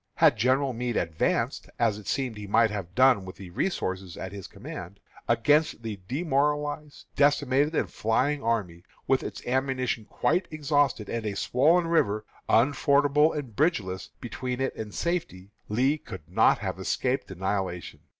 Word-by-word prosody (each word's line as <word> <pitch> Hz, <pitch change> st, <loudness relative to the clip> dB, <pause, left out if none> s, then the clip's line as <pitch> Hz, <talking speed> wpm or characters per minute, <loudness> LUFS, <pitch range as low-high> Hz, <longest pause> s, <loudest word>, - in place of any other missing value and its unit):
Had -, -, +5 dB
General 130 Hz, +2 st, +2 dB
Meade 120 Hz, 0 st, -2 dB
advanced, 80 Hz, -1 st, -1 dB
as 110 Hz, -3 st, +1 dB
it 105 Hz, -, -13 dB
seems 130 Hz, -5 st, -1 dB
he 105 Hz, -1 st, -8 dB
might 115 Hz, +2 st, +4 dB
have 95 Hz, -4 st, -6 dB
done 130 Hz, -5 st, +5 dB
with 95 Hz, 0 st, -9 dB
the 95 Hz, -2 st, -10 dB
resources 95 Hz, -, -2 dB
at 95 Hz, -, -6 dB
his 100 Hz, -2 st, -8 dB
command, 100 Hz, -, -9 dB, 0.3 s
against 150 Hz, -4 st, +2 dB
the 110 Hz, -3 st, -5 dB
demoralized, 150 Hz, -, -1 dB
decimated, 145 Hz, +1 st, +3 dB
and -, -, +1 dB
flying 140 Hz, +6 st, 0 dB
army, 100 Hz, -8 st, -1 dB, 0.2 s
with 135 Hz, -1 st, +2 dB
its -, -, -7 dB
ammunition 130 Hz, -3 st, -1 dB
quite 180 Hz, -, 0 dB
exhausted, 145 Hz, -7 st, +1 dB
and 115 Hz, -2 st, -3 dB
a 100 Hz, -, -3 dB
swollen 160 Hz, -, +3 dB
river, 110 Hz, -11 st, +1 dB, 0.2 s
unfordable 145 Hz, +4 st, +4 dB
and 135 Hz, -8 st, -6 dB
bridgeless, 105 Hz, -, 0 dB
between 125 Hz, +1 st, -4 dB
it 135 Hz, -, -1 dB
and 105 Hz, -2 st, -7 dB
safety, 105 Hz, -, -3 dB, 0.2 s
Lee 130 Hz, +8 st, +2 dB
could 85 Hz, -, -10 dB
not -, -, +4 dB
have -, -, -4 dB
escaped 130 Hz, +1 st, -1 dB
annihilation. 95 Hz, -2 st, -3 dB
125 Hz, 150 wpm, -27 LUFS, 100-145 Hz, 0.3 s, Had